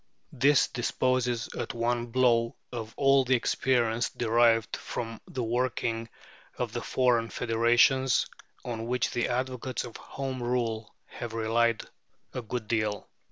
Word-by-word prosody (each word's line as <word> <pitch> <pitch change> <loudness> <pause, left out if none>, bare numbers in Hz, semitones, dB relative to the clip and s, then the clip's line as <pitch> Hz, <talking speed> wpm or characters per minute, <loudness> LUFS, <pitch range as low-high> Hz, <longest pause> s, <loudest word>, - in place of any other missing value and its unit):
This 140 +2 +4
disposes 125 -1 0
at - - -4
one 120 0 0
blow 115 -1 +2 0.2
of 115 -3 -5
all 135 -1 +5
the 130 0 +3
experience 120 -1 +1
derived 115 -1 +2
from 115 -1 -5
the 125 - -3
working 115 -1 -1 0.5
of - - -3
the - - -2
foreign 120 -3 +2
federations, 120 +4 +3 0.4
on 115 -2 -4
which 125 +1 0
the 120 - 0
advocates 125 0 -2
of 120 - -8
Home 135 -2 -5
Rule 115 -3 -1
have 115 -2 -7
relied 115 +1 +1 0.5
a 125 - -3
good 115 -1 -5
deal. 110 -3 -1
120 Hz, 130 wpm, -28 LUFS, 115-125 Hz, 0.5 s, all